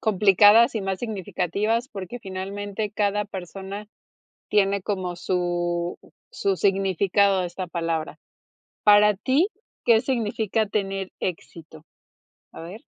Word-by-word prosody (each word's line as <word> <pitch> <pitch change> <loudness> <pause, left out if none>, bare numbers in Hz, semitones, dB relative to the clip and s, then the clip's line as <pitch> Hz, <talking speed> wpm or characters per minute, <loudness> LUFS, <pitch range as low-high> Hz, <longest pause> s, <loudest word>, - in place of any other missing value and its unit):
complicadas 210 +2 +5
y 220 - -1
más 190 -1 -2
significativas, 215 +2 -2
porque 200 +1 -7
finalmente 200 +1 -5
cada 210 -1 0
persona 195 +2 -7 0.6
tiene 200 -1 +2
como 185 -3 -3
su 175 -1 -1 0.3
su 195 -1 0
significado 195 0 +2
de 180 - -2
esta 180 +1 -6
palabra. 165 -2 -3 0.6
Para 210 0 +6
ti, 270 - +2 0.4
¿qué 225 -2 +5
significa 220 -3 -1
tener 195 -2 -3
éxito? 160 -3 -6 0.7
¿A - - -10
ver? 180 +7 -9
195 Hz, 110 wpm, -24 LUFS, 180-210 Hz, 0.7 s, Para